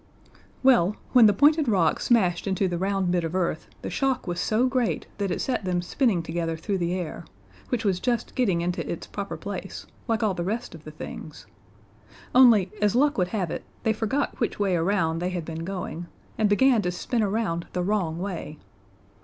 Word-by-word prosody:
Well, 215 -7 +5 0.2
when 245 -4 +8
the 205 - +4
pointed 295 +6 +4
rock 185 -7 +2
smashed 190 -7 +2
into 190 0 +1
the 175 -1 -2
round 195 -1 0
bit 175 -1 +1
of 165 +2 -3
earth 170 -3 -1 0.2
the - - -4
shock 270 -2 0
was 175 -2 -3
so 220 +6 +2
great 250 - 0
that 200 -1 0
it 175 - -2
set 260 - -1
them 180 -1 -1
spinning 195 -3 +1
together 165 0 -2
through 195 +4 -2
the 175 +1 0
air 175 -2 -5 0.5
which 235 -2 -1
was 190 -3 +1
just 240 0 -1
getting 195 -10 +1
into 175 +1 -2
its - - -5
proper - - -5
place, - - -6 0.2
like 225 -2 0
all 210 -3 +2
the 175 - -3
rest 225 +7 -3
of 160 -2 -12
the - - -7
things 155 -7 -9 0.9
only, 230 -7 +6
as 210 +1 +2
luck 285 -1 +3
would 180 - +2
have 185 -4 -2
it, - - -4 0.2
they 220 -2 +2
forgot 225 +6 -1
which 230 - -1
way 195 -3 +2
around 165 -2 +1
they 180 +1 -1
had 175 -3 -4
been 165 0 -5
going, 175 -2 -5 0.3
and 215 -2 +2
began 245 +2 +4
to 180 - -1
spin 225 +6 -2
around 200 -5 -1
the 180 - -1
wrong 180 -5 0
way. 175 -5 -5
190 Hz, 200 wpm, -25 LUFS, 175-225 Hz, 0.9 s, when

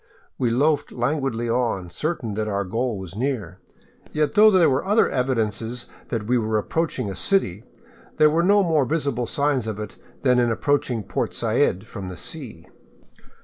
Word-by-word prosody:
We 125 - +2
loafed 145 +6 +1
languidly 125 -2 -1
on, 115 -7 -1
certain 130 - -3
that 105 +1 -2
our 100 -1 -1
goal 115 +3 -2
was 95 -1 -8
near, 110 - -3 0.5
yet 150 -1 0
though 215 +1 +7
there 185 -5 +5
were 130 0 +1
other 210 +4 +3
evidences 120 -2 -1 0.2
that 115 -3 -3
we 125 +2 +2
were 110 -1 0
approaching 160 +3 -1
a - - -6
city, 110 - +1 0.5
there 150 0 +5
were 165 +2 +2
no 200 +3 +4
more 160 -5 +2
visible 140 -6 -1
signs 140 -4 0
of 110 -1 -4
it 105 -1 -7 0.3
than 125 -2 +4
ia 120 -1 +3
approaching 125 -2 0
Port - - -3
Said 95 +4 +1
from 100 -4 -7
the 90 - -8
sea. 125 - -6
125 Hz, 170 wpm, -23 LUFS, 110-150 Hz, 0.5 s, though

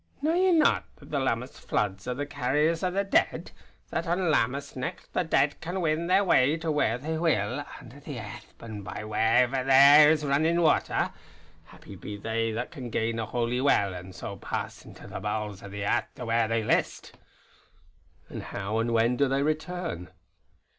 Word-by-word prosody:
"Knew 315 +2 +2
ye 370 +2 +3
not, 325 -3 +3
that - - -16
the 145 - 0
Lammas 125 -1 -2
Floods 100 0 -2
are 125 - -2
the 145 +2 -3
carriers 145 +4 0
o' 185 - +2
the 195 +2 0
Dead; 195 - 0 0.4
that - - -2
on 175 0 +1
Lammas 140 +1 0
nicht 130 +8 -6
the - - +1
Dead 145 -3 +1
can 175 +4 -4
win 165 0 0
their 190 +3 +4
way 150 -4 +3
to 160 -1 -2
where 120 -6 +1
they 160 +5 -4
will, 145 - 0 0.2
under 125 +4 -13
the 145 -2 -8
airth 110 0 -9
by 105 -3 -7
wherever 120 +4 +2
there 140 +3 +8
is 155 -1 +2
rinnin' 160 +5 +2
watter. 155 - +2 0.5
Happy - - -13
be 105 -1 -7
they 115 +2 -2
that 115 +3 -4
can 125 -3 -7
gain 115 0 -1
a 110 - -3
Holy 120 +1 -1
Well, 100 -8 +2
an' 90 +1 -8
so - - -7
pass - - -5
into - - -13
the - - -7
bowels 105 -2 -4
o' 100 - -9
the 100 0 -5
airth - - -1
to 125 - -7
where 115 0 +1
they 115 0 0
list." - - -1 1.1
"And - - -7
how 100 +3 -3
and 115 +1 0
when 115 +2 +2
do 140 - +3
they 135 +1 0
return?" 155 - -3
130 Hz, 190 wpm, -27 LUFS, 115-155 Hz, 1.1 s, there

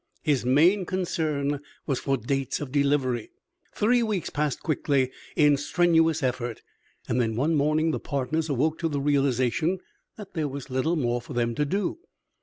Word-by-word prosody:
His 145 -6 +1
main 170 +10 +4
concern 155 -6 -1 0.3
was 135 -3 -1
for 135 -1 0
dates 135 +3 -2
of 145 -3 -6
delivery. 140 -5 +1 0.5
Three 240 +3 +3
weeks 210 -7 -1
passed 150 -1 -1
quickly 140 -4 +1 0.2
in 150 -2 +5
strenuous 165 0 +2
effort, 120 -3 -2 0.4
and 125 - +1
then 110 -2 -1
one 145 +8 +1
morning 155 +2 +2
the - - -2
partners 155 +3 -2
awoke 150 +4 0
to 165 - 0
the 145 -2 -1
realization 140 +4 +1 0.4
that 205 -3 -10
there 155 -3 -1
was 135 -1 -7
little 130 +7 +1
more 120 -5 0
for 120 - -9
them 120 -1 0
to 150 +5 0
do. 195 - -1
145 Hz, 165 wpm, -26 LUFS, 130-160 Hz, 0.5 s, in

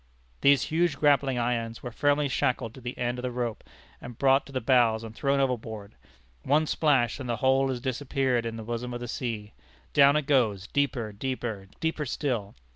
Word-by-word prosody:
These 140 -2 +5
huge 160 -2 0
grappling 140 -3 +3
irons 115 -1 -2
were 120 - -5
firmly 145 +3 +2
shackled 125 -3 -1
to 130 - -12
the 120 +1 -6
end 120 0 -2
of - - -4
the 125 - -2
rope, 120 -2 -3 0.4
and 120 -1 -9
brought 135 0 +3
to - - -12
the 130 - -1
bows 115 -3 +3
and 110 -1 -8
thrown 140 +3 0
overboard. 110 -6 -2 0.5
One 150 +3 +2
splash, 140 -6 +2
and 130 -3 -6
the 120 - +1
whole 135 +3 +2
has 130 -2 -2
disappeared 130 -1 -1
in 115 -1 -4
the 110 - -6
bosom 120 +2 -4
of - - -4
the - - -7
ocean. 115 -3 -4 0.4
Down 140 0 +6
it 150 -2 +1
goes 115 -9 +2
deeper, 130 -3 -1
deeper, 110 -3 -4
deeper 160 -3 -2
still! 120 -8 -2
125 Hz, 195 wpm, -27 LUFS, 115-140 Hz, 0.5 s, Down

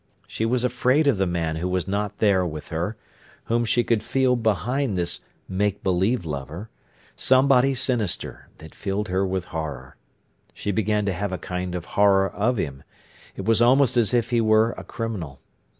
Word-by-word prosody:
She 110 - -2
was 125 +1 +1
afraid 125 +4 +2
of 140 -7 +3
the 95 0 +1
man 85 -2 -1
who 90 +3 -2
was 90 0 -1
not 105 +1 -2
there 100 -4 +3
with 80 -3 -5
her, 85 +7 -3 0.5
whom 120 +1 0
she 120 +2 +2
could 115 -2 +1
feel 130 +2 +1
behind 115 +1 0
this 85 -1 -2 0.3
make 100 +1 -1
belief 95 +3 +1
lover; 75 +7 -6 0.4
somebody 135 0 +4
sinister, 120 -7 -1
that 80 -1 -13
filled 100 +1 -3
her 95 +1 +1
with 95 -1 -2
horror. 70 -5 -5 0.6
She 100 - -3
began 105 0 0
to 100 - 0
have 100 +2 -3
a 95 - -2
kind 90 0 -4
of 85 - -5
horror 100 -1 +4
of 110 +7 0
him. 70 -7 -3 0.5
It - - -6
was 115 0 +3
almost 130 +1 +4
as 120 -3 +3
if 120 -1 +1
he 120 -1 +3
were 110 +1 +4
a - - -9
criminal. 95 - -5
105 Hz, 180 wpm, -24 LUFS, 90-120 Hz, 0.6 s, somebody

